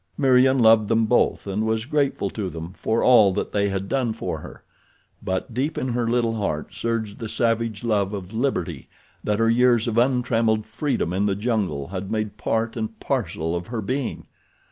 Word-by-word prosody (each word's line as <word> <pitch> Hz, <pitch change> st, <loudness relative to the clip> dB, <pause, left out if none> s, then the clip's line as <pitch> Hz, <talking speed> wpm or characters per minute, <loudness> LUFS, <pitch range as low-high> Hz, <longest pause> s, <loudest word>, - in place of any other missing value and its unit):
Meriem 130 Hz, 0 st, +4 dB
loved 110 Hz, -3 st, +5 dB
them 115 Hz, 0 st, +2 dB
both 120 Hz, +3 st, +2 dB
and 100 Hz, +2 st, -2 dB
was 110 Hz, 0 st, 0 dB
grateful 140 Hz, -8 st, 0 dB
to 100 Hz, -4 st, -3 dB
them 85 Hz, +1 st, -7 dB
for 110 Hz, +3 st, -1 dB
all 110 Hz, -6 st, +6 dB
that 105 Hz, -, -3 dB
they 100 Hz, -1 st, +1 dB
had 95 Hz, 0 st, -3 dB
done 125 Hz, -3 st, 0 dB
for -, -, -4 dB
her; -, -, -11 dB, 0.6 s
but 95 Hz, +6 st, -3 dB
deep 140 Hz, +6 st, -1 dB
in 130 Hz, -, -1 dB
her 120 Hz, -1 st, -1 dB
little 115 Hz, -1 st, +1 dB
heart 90 Hz, -6 st, -3 dB
surged 110 Hz, 0 st, -3 dB
the 115 Hz, -, -5 dB
savage 115 Hz, -2 st, 0 dB
love 105 Hz, -4 st, +1 dB
of 100 Hz, -1 st, -6 dB
liberty 90 Hz, -, -2 dB, 0.4 s
that 105 Hz, -1 st, 0 dB
her 115 Hz, +1 st, +2 dB
years 120 Hz, 0 st, +3 dB
of 115 Hz, 0 st, +1 dB
untrammeled 115 Hz, -4 st, +2 dB
freedom 110 Hz, -, -2 dB
in 100 Hz, +2 st, +1 dB
the 100 Hz, -, 0 dB
jungle 100 Hz, -, -1 dB
had 95 Hz, 0 st, -5 dB
made 110 Hz, -2 st, -2 dB
part 115 Hz, +1 st, -1 dB
and 110 Hz, -2 st, -4 dB
parcel 80 Hz, +2 st, -2 dB
of 85 Hz, 0 st, -4 dB
her 115 Hz, -1 st, -4 dB
being. 125 Hz, +5 st, -3 dB
110 Hz, 190 wpm, -23 LUFS, 100-120 Hz, 0.6 s, all